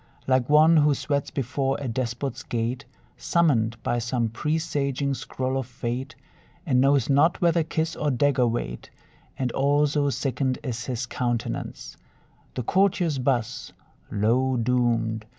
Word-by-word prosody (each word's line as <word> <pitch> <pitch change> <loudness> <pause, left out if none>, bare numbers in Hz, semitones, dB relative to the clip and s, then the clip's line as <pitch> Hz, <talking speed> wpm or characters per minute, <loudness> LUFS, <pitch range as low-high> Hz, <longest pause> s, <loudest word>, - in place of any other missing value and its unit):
Like 130 -1 +1
one 155 +2 +6
who 150 -1 +4
sweats 140 0 -2
before 135 +1 -1
a 140 - -4
despot's 120 +2 -3
gate, 120 +2 -3 0.3
Summoned 120 -10 +1
by 120 - 0
some 120 -1 -1
presaging 140 0 -1
scroll 130 0 -3
of 130 - -5
fate, 125 0 -4 0.5
And 130 -6 +3
knows 135 -2 +3
not 145 +5 +3
whether 170 -1 +3
kiss 160 +1 -2
or 150 - -1
dagger 130 -1 +2
wait; 85 - -4 0.5
And 130 -2 -1
all 145 +3 +2
so 145 0 +1
sickened 130 -1 -1
is 120 -3 -4
his 125 -2 -2
countenance, 120 -1 -4 0.6
The 125 - -2
courtiers 180 - +1
buzz, 125 -3 -1 0.4
"Lo, 125 +5 +1
doomed!" 115 -2 +1
130 Hz, 135 wpm, -25 LUFS, 120-145 Hz, 0.6 s, one